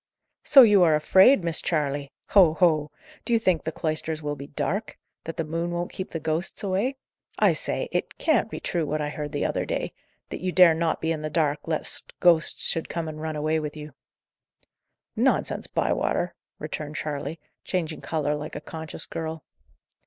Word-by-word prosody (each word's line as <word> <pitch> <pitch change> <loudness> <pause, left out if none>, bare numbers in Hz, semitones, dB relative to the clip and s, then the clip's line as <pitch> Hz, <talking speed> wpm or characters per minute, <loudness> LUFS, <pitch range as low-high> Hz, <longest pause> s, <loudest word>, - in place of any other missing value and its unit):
"So 275 -2 +9
you 210 -4 +6
are 160 -3 +5
afraid, 190 - +5
Miss 170 -1 +1
Charley! 145 -3 -1 0.2
Ho! 175 -6 +6
ho! 155 -3 +3 0.3
Do 235 - -1
you - - +6
think 185 -7 +1
the 160 - -4
cloisters 155 0 -3
will 145 0 -2
be 140 0 -9
dark? 200 +8 -3 0.3
that 165 - -6
the 165 - 0
moon 165 +2 -3
won't 175 0 -3
keep 185 - -5
the 165 - -4
ghosts 160 +6 -3
away? 200 +8 0 0.4
I - - +4
say, - - -2
it - - -2
can't 310 -8 +2
be - - -6
true, 170 -2 -1
what 155 +1 -1
I 150 0 -2
heard 150 -1 -5
the 145 - -1
other - - -1
day - - -3 0.4
that - - -6
you 185 0 -1
dare 180 -2 +7
not 165 0 -1
be 160 - 0
in 155 -2 -2
the 155 - -3
dark, 150 -1 0
lest 160 -1 -2
ghosts 170 -2 +3
should 165 - 0
come 170 -1 -3
and 155 0 -7
run 160 -1 -3
away 155 +1 0
with 150 0 -5
you!" 150 -1 -9 1.2
"Nonsense, - - +1
Bywater!" - - 0 0.2
returned 150 0 -6
Charley, 150 +2 -4 0.2
changing 165 -4 -3
colour 150 -2 -1
like 150 +1 -5
a - - -3
conscious 160 0 -6
girl. 160 -1 -5
160 Hz, 190 wpm, -25 LUFS, 150-175 Hz, 1.2 s, So